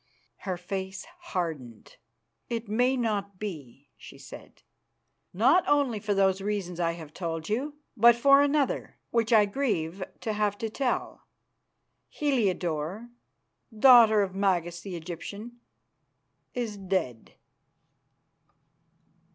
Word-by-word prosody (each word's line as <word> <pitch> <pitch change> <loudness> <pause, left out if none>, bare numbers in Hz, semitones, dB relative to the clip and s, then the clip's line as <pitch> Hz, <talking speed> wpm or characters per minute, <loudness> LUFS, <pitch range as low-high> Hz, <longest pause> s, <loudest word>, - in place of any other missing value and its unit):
Her 185 - -1
face 190 +1 -5
hardened. 160 - -5 0.5
"It 230 -1 -3
may 245 +5 +2
not 205 -5 -2
be," 145 - -8
she - - -13
said, - - -13 0.7
"not 265 - +4
only 280 -7 +2
for 205 -1 -1
those 195 -1 +2
reasons 195 -4 -3
I 170 -1 +1
have 160 -3 -10
told 165 -3 -4
you, 275 +7 -2 0.2
but 235 +1 +6
for 275 +3 +6
another 285 -1 0
which 230 0 +1
I 215 -2 +6
grieve 200 - -2 0.2
to 220 - -2
have 210 -1 0
to 225 0 -4
tell. 255 0 -3 0.8
Heliodore, 200 - -1 0.7
daughter 225 -4 +7
of 190 -2 -4
Magas 175 -3 0
the 190 -1 -7
Egyptian, 200 +8 -8 1.0
is 230 -4 -3
dead. 185 - -3
205 Hz, 110 wpm, -27 LUFS, 175-235 Hz, 1.0 s, daughter